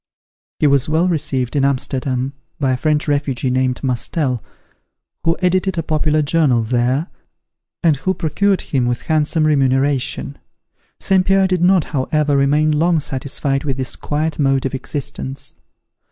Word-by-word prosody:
He - - +1
was 140 -1 +3
well 160 +4 +2
received 135 -7 -1
at 140 - +2
Amsterdam, 130 -1 -1 0.3
by 135 -3 +1
a 130 - 0
French 150 +3 0
refugee 140 -3 0
named 130 0 0
Mustel, 130 0 -1 0.8
who 165 +1 +1
edited 185 0 +1
a 165 - 0
popular 155 -1 +1
journal 145 -6 +2
there, 125 +6 0 0.8
and 160 -4 +3
who 185 +6 -1
procured 195 +4 +1
him 130 -4 -1
employment, - - +1
with 120 - -2
handsome 155 +1 +2
remuneration. 140 -1 +1 0.6
St. 190 -1 +2
Pierre 195 +1 +3
did 185 -2 0
not, 180 -1 +4
however, 145 +1 +1
remain 145 +3 +3
long 165 +2 +2
satisfied 135 0 -2
with 135 -3 -2
this 130 -2 -3
quiet 155 +2 -2
mode 135 -2 +2
of 135 - -2
existence. 135 0 -5
145 Hz, 150 wpm, -18 LUFS, 130-160 Hz, 0.8 s, not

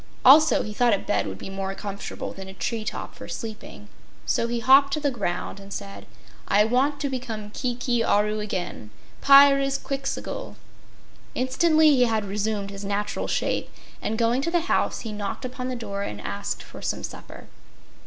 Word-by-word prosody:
Also 305 +5 +7
he 210 - -6
thought 235 -1 +3
a - - -2
bed 105 - -1
would 95 - -6
be - - -8
more 195 0 -4
comfortable 200 0 -6
than 190 0 -9
a 190 - -10
tree 225 +2 -2
top 215 - -5
for - - -10
sleeping, 215 -2 -7 0.4
so 230 - +1
he 235 0 -2
hopped 270 +4 +6
to 305 - 0
the 290 -2 0
ground 200 -4 -3
and 195 0 -12
said: 100 - -7 0.4
"I 205 +1 +5
want 270 +5 +1
to 285 - 0
become 230 -6 -5
Kiki 245 -1 -1
Aru 210 0 +2
again 185 - -4 0.3
Pyrzqxgl!" 275 - +3 0.8
Instantly 310 +5 +4
he 255 -3 +4
had 220 -3 0
resumed 200 0 -2
his 200 0 -8
natural 205 +1 -2
shape, - - -1 0.3
and 220 - -2
going 235 +3 +2
to 335 - -1
the 345 0 +2
house, 355 - 0
he 225 - -5
knocked 205 +4 -4
upon 255 0 -5
the 255 - -3
door 200 -4 -5
and 105 - -5
asked 100 -1 -4
for - - -12
some - - -3
supper. - - -9
225 Hz, 175 wpm, -25 LUFS, 200-265 Hz, 0.8 s, Also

